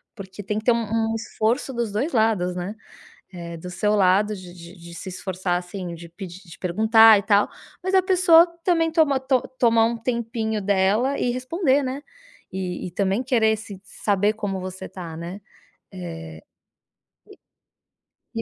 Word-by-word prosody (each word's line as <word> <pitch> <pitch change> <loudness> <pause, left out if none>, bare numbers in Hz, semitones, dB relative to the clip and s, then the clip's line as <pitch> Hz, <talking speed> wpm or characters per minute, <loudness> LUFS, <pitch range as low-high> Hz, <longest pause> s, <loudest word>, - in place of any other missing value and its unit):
porque 195 -1 -9
tem 210 +2 -2
que 215 - -12
ter 245 - +5
um 235 0 +1 0.3
um - - -1
esforço 230 +4 -1
dos 235 -3 -2
dois 260 +10 -2
lados, 215 -6 +2
né. 180 +4 -4 0.6
É, 170 -2 -7
do 180 +2 -8
seu 210 +4 0
lado, 200 +2 +3
de 180 -2 -11
de 175 0 -12
de 170 -2 -12
se 185 - -7
esforçar 185 -1 -3
assim, 180 -1 -7
de 170 0 -11
pedi 185 0 -9
de 155 - -12
perguntar 220 +4 +6
e - - -3
tal, 205 -1 +3 0.4
mas 375 - -2
a 380 - +6
pessoa 360 -2 +6 0.2
também 330 -2 +2
toma 310 -5 +3
to 260 -1 +1 0.2
tomar 230 -2 +4
um 235 +1 0
tempinho 225 -2 -2
dela 205 +7 +2
e - - 0
responder, 270 +2 +1
né. 265 +2 -4 0.5
E 185 -1 -4
e - - -9
também 195 +5 0
querer 225 -4 +2
se 205 -3 -9
saber 205 +1 0
como 205 -3 -3
você 185 0 -7
tá, 170 -4 -8
né, 175 +5 -7 0.5
eh, 80 -3 -8 1.9
e 225 - -1
210 Hz, 170 wpm, -23 LUFS, 180-235 Hz, 1.9 s, perguntar